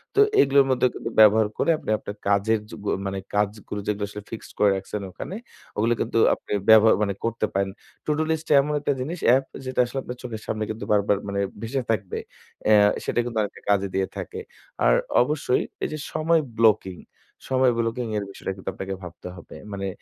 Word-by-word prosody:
তো - - +3 0.2
এগুলোর 140 0 +5
মধ্যে 130 0 +3
কিন্তু - - -5
ব্যবহার 110 0 +7
করে - - +1
আপনি - - -9
আপনার 105 -1 -7
কাজের 100 +2 +2
যেগুল 105 -1 -3
মানে 95 0 -3 0.2
কাজগুলো 105 0 -1
যেগুলো 105 0 -1
আসলে 105 0 -8
ফিক্সড 115 - -8
করে 105 - +5
রাখছেন 95 +2 -5
ওখানে, 180 - -7 0.4
ওগুলো 115 +3 +2
কিন্তু - - -1 0.2
আপনি - - -9 0.2
ব্যবহার 110 0 +8
মানে 100 -1 0
করতে 115 -1 0
পারেন। 100 0 0 0.4
To - - 0
do 155 - +1 0.4
এমন 150 +2 -2
একটা 145 -1 0
জিনিস 160 +7 -4 0.2
App 135 0 +1 0.2
যেটা 130 0 -3
আসলে 130 +2 -4
আপনার 125 - -7
চোখের 110 -3 -6
সামনে 110 - -2
কিন্তু 110 +2 -5
বারবার 105 -1 +3
মানে 100 0 -2 0.2
ভেসে 130 +4 -2
থাকবে। 100 -4 -2 0.5
অ্যা 105 -1 +6 0.2
সেটা - - -1
কিন্তু 120 -2 -5
অনেকটা 105 - -5
কাজে 100 -1 +3
দিয়ে 95 0 +1
থাকে। - - -5 0.5
আর - - +6 0.3
অবশ্যই 135 -1 +1 0.2
এই - - 0
যে - - -3 0.2
সময় 160 +1 +2 0.2
ব্লকিং 105 -5 +3 0.5
সময় 130 -1 +4
ব্লকিং 115 +1 -1
এর 105 - -1
বিষয়টা 95 - -5
কিন্তু 95 - -5
আপনাকে 95 +2 -5
ভাবতে 90 0 -9
হবে। 85 - -12 0.2
মানে 100 -1 -3
110 Hz, 190 wpm, -24 LUFS, 100-125 Hz, 0.5 s, ব্যবহার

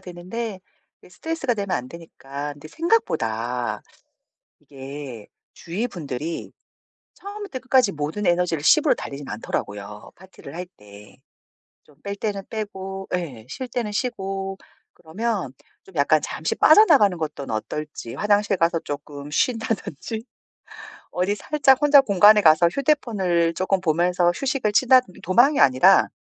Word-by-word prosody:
되는데 185 +4 -6 0.4
이 - - -16
스트레스가 275 - -3
되면 200 -3 -4
안 125 - -6
되니까 145 -3 -8
근데 145 +1 -13
생각보다 120 - -1 0.8
이게 135 -4 -9 0.3
주위 195 +8 -4
분들이 155 - -6 0.6
처음부터 405 -8 -8
끝까지 255 -4 +3
모든 155 +6 -4
에너지를 175 -3 +1
10 - - +5
으로 - - +4
달리진 140 0 -8
않더라고요 105 -1 -5
파티를 185 -5 -13
할 180 +1 -5
때. 105 0 -16 0.7
좀 145 - -23
뺄 200 0 -5
때는 200 -1 -3
빼고 195 -3 -6
예. 140 -11 -6
쉴 260 -1 -6
때는 235 -3 -3
쉬고 195 -4 -3 0.4
그러면 190 - -3 0.3
좀 190 - -18
약간 150 +1 +3
잠시 160 - -3
빠져나가는 295 - +6
것 155 -2 -4
떤 140 - -7
어떨지 115 +2 -5
화장실 205 -1 +2
가서 165 -1 +1
쪼끔 145 -1 -7
쉰다든지 225 - -2 0.9
어디 185 +3 0
살짝 270 +3 +2
혼자 295 -1 +7
공간에 210 -3 +6
가서 160 -1 +5
휴대폰을 195 - +1
쪼끔 185 +2 0
보면서 175 +1 +2
휴식을 265 -2 -1
치다든 255 -2 +4
도망이 245 - +4
아니라 130 -1 +5
180 Hz, 295 characters per minute, -23 LUFS, 145-220 Hz, 0.9 s, 혼자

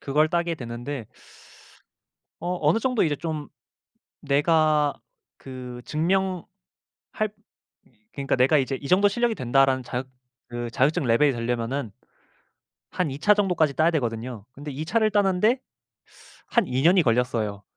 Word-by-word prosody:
그걸 150 +3 +2
따게 170 -1 0
됐는데 120 -1 -6 1.3
어 180 +1 -2
어느 195 - +4
정도 250 0 +1
이제 150 -3 +1
좀 155 -3 -5 0.7
내가 150 0 +2 0.4
그 125 -2 -9
증명할 185 +3 0 1.7
그러니까 140 -1 -1
내가 130 +4 +4
이제 135 0 0
이 140 - -6
정도 195 +5 +5
실력이 235 +2 0
된다라는 130 - +2
자격 125 +2 -5 0.4
그 120 0 -5
자격증 135 +5 +1
레벨이 120 +5 +4
되려면은 120 0 -2 1.0
한 180 -3 0
2 135 - -6
차 205 +7 +4
정도까지 180 -8 +1
따야 160 +3 +3
되거든요. 120 -5 -3
근데 145 +2 -8
2 145 +3 -5
차를 215 +5 +2
따는데 205 +4 +2 0.9
한 235 - +1
2년이 165 +8 +4
걸렸어요. 115 -5 0
145 Hz, 265 characters per minute, -25 LUFS, 125-175 Hz, 1.7 s, 정도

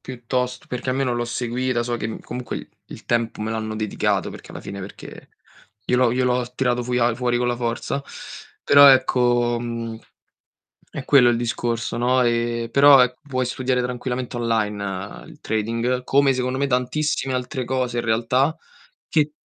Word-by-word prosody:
piuttost 125 0 -4
perché 125 +1 -4
almeno 130 -1 0
l'ho 120 - -1
seguita, 120 +1 -2
so 120 0 -2
che, 110 - -4
mhmm, 110 - -6
comunque, 125 0 -6 0.2
il - - -11
tempo 115 -2 -1
me 110 +1 -2
l'hanno 110 -1 -3
dedicato, 110 -1 -1
perché - - -12
alla - - -8
fine 100 0 -7
perché 95 +2 -10 0.6
glielo 125 -1 +2
glielo 125 0 +1
tirato 125 -2 0
a 120 -1 +1
fuori 120 0 0
con 125 - 0
la 120 - +1
forza. 120 +3 -3 0.6
Però 140 0 +8
ecco, 120 -2 +3
mhmm, 115 -1 -5 1.0
è - - -6
quello 125 -4 +6
il 120 - +2
discorso, 120 -1 -2
no, 125 +2 +2
ehm, 115 -1 0
però 140 +1 +7
ecco, 125 0 0
puoi 130 -2 -1
studiare 125 0 -1
tranquillamente 125 0 -4
online 105 -4 -2
il - - -15
trading, 115 +3 -1
come 140 +1 +3
secondo 125 +1 -2
me 140 - +1
tantissime 135 +2 -1
altre 125 0 -3
cose 125 -1 -1
in 120 - -1
realtà 125 +7 +1 0.5
che 150 -2 +1
125 Hz, 160 wpm, -22 LUFS, 115-130 Hz, 1.0 s, Però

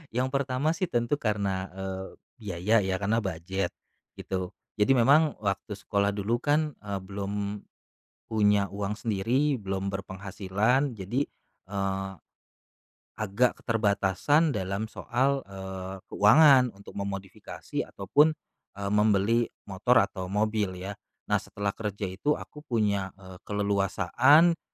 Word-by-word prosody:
Yang 125 +1 +2
pertama 140 +2 0
sih 170 +2 -1
tentu 120 0 0
karena, 100 -4 -1
eee, 95 0 -5 0.3
biaya 100 0 0
ya, 95 -1 0
karena 100 +4 +1
budget, 95 -1 -3 0.4
gitu. 95 -1 -4 0.2
Jadi 105 +6 +5
memang, 145 +5 +5
waktu 100 +2 -2
sekolah 100 0 0
dulu 110 +4 0
kan, 150 +3 +1
eee, 100 -2 -4
belum, 100 +1 -4 0.7
punya 105 -2 +4
uang 100 +1 -3
sendiri, 120 +6 0
belum 95 0 -3
berpenghasilan, 100 +7 -1
jadi, 115 +9 -2 0.4
eee, 95 -1 -2 1.1
agak 110 +4 +1
keterbatasan 110 - +2
dalam 100 +1 -3
soal, 135 +3 0
eee, 95 -1 -6 0.2
keuangan, 125 +2 +6
untuk 100 - -13
memodifikasi 100 -1 -5
ataupun, 150 +11 +3 0.4
eee, 100 0 -3
membeli 105 +2 +3 0.2
motor 100 +5 +1
atau 95 -2 -5
mobil 105 -1 0
ya. 95 +2 -5 0.4
Nah - - +4
setelah 100 -1 -3
kerja 105 -1 -5
itu 100 +11 0
aku 150 - -10
punya, 100 -5 0
eee, 95 -1 -12
keleluasaan, 105 - +3
100 Hz, 120 wpm, -28 LUFS, 95-120 Hz, 1.1 s, keuangan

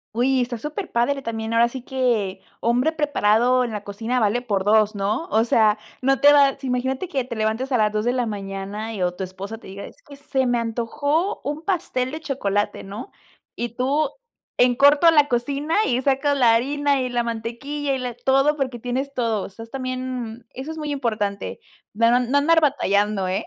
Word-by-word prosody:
¡Uy! 255 +2 +2
Está 240 -1 -2
superpadre, 280 - -2
también 225 -2 -4
ahora 235 +1 +5
sí 245 +1 -7
que 230 -8 -1 0.2
hombre 245 +6 +2
preparado 255 -5 +2
en 240 - -3
la 210 -1 -5
cocina 225 +5 -2
vale 220 +2 +1
por 205 -6 -1
2, 215 +1 +3
¿no? 205 +9 -1
O 220 +1 +3
sea, 220 -2 +3 0.2
no 270 +1 +2
te 290 - +8
va 280 -2 +5
si 270 - -6
imagínate 260 +6 -1
que 275 -7 -1
te 240 -2 -6
levantes 220 +5 -1
a 250 - +3
las 210 -1 +2
2 215 +1 -1
de 245 - +2
la 250 -2 0
mañana 200 +1 -5
y 195 - -5
o 180 0 +1
tu 190 - -5
esposa 190 +4 -7
te - - -14
diga: 195 +1 -8
"Es - - -15
que 285 - -13
se 270 -2 -1
me 245 -1 +1
antojó 285 - -1
un 295 +3 -4
pastel 320 -9 -1
de 315 +2 -6
chocolate", 205 -9 -1
¿no? 205 +6 -8 0.4
Y 240 0 -3
tú 275 +4 +1 0.5
en 245 0 +5
corto 285 +5 +6
la 295 -2 +5
cocina, 280 +6 -1
y 245 +1 +1
sacas 275 +2 +1
la 235 -4 +5
harina, 285 +3 +1
y 255 - -2
la 245 -1 0
mantequilla 235 +6 -3
y 265 - -1
la 250 -2 -4
todo, 270 +4 +2
porque 260 -4 -2
tienes 260 +4 -3
todo. 230 -5 0
O - - -7
sea, 200 - -12
es 230 - -22
también, 255 -3 -5
eso 270 +5 -7
es 320 - -7
muy 300 -1 -3
importante, 215 - -2 0.3
dar 230 +3 +3
un 250 - +3
no - - -9
no 285 - +4
andar 325 +3 +4
batallando, 205 -9 +1
¿eh? 185 +1 -2
245 Hz, 210 wpm, -22 LUFS, 220-275 Hz, 0.5 s, te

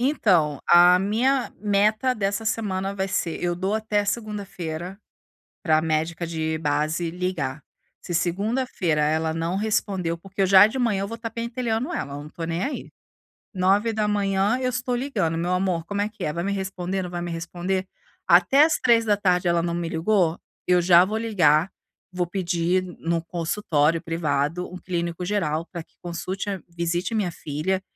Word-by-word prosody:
Então, 180 - +2
a 175 +1 +7
minha 240 +7 +1
meta 215 +5 +2
dessa 200 +1 -1
semana 195 -3 -1
vai 190 -1 -2
ser 170 -3 -2
eu 175 0 0
dou 190 +3 -1
até 215 -1 0
segunda-feira 195 -5 -4 0.6
pra 155 -4 +3
médica 160 +2 -1
de 160 -1 -2
base 155 +3 -1
ligar. 170 -6 -3 0.4
Se 175 - -5
segunda-feira 185 -2 0
ela 160 +1 +1
não 165 +3 -2
respondeu, 195 -5 -1
porque 195 +3 -8
eu - - +4
já 190 +1 +8
de 240 +5 -4
manhã, 225 -6 +1
eu 200 - -3
vou 230 +1 -6
tá 230 0 -5
pentelhando 235 +4 -2
ela, 140 - -4
eu 145 - -6
não 150 - -11
tô 165 - -6
nem 165 +2 -2
aí. 285 - -5 0.6
9 195 +4 +2
da 215 -1 0
manhã 200 +2 +1
eu 255 - +1
estou 250 0 -2
ligando: 215 - -1
"Meu 175 +2 -1
amor, 180 -2 0
como 205 +3 -2
é 205 - 0
que 210 -3 -9
é? 150 - 0
Vai 170 - -3
me 200 - -1
responder? 190 -1 -3
Não 180 - -5
vai 175 0 -4
me 175 0 -4
responder? 175 +3 -3 0.4
Até 180 - +6
às 320 - +2
3 230 -2 +4
da 205 -2 +2
tarde, 180 -3 +1
ela 170 0 +2
não 170 0 -1
me 170 -1 -3
ligou, 170 0 +1 0.3
eu 180 -1 +4
já 175 0 +7
vou 215 +3 -2
ligar, 180 -7 +3 0.4
vou 180 -1 -1
pedir 180 0 0 0.2
no 165 0 -1
consultório 165 -2 0
privado, 165 0 -1
um - - -5
clínico 170 -1 -3
geral 165 -5 -1
pra 170 -3 -6
que - - -37
consulte 185 +4 -4
a 195 -3 -4
visite 170 +4 -2
a - - +1
minha 195 -5 0
filha 165 +5 -2
185 Hz, 180 wpm, -24 LUFS, 165-210 Hz, 0.6 s, já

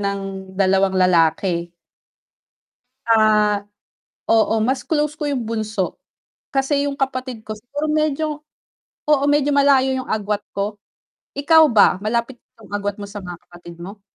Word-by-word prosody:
ng 200 0 -2 0.4
2 195 0 +2
lalaki. 170 -1 +2 1.4
Ah, 215 -2 +3 0.7
oo, 225 0 +3
mas 260 +5 0
close 300 -1 -1
ko 305 - -5
'yung 270 -5 -2
bunso, 215 -4 -3 0.6
kasi 280 +1 +1
'yung 280 -1 -3
kapatid 255 -4 -3
ko, 215 - -5
siguro 285 +7 -5
medyo 305 0 -1 0.7
oo, 295 -2 +3
medyo 290 0 +2
malayo 275 -2 +4
'yung 260 -1 -5
agwat 210 -1 -2
ko. 200 +1 -2 0.6
Ikaw 320 +3 +6
ba, 215 -5 +5
malapit 235 +3 -1 0.2
'yung 215 - -16
agwat 205 0 -2
mo 200 - -6
sa 205 -1 -8
mga 175 -1 -7
kapatid 175 -1 -13
mo? 200 +3 -9
220 Hz, 135 wpm, -20 LUFS, 200-275 Hz, 1.4 s, Ikaw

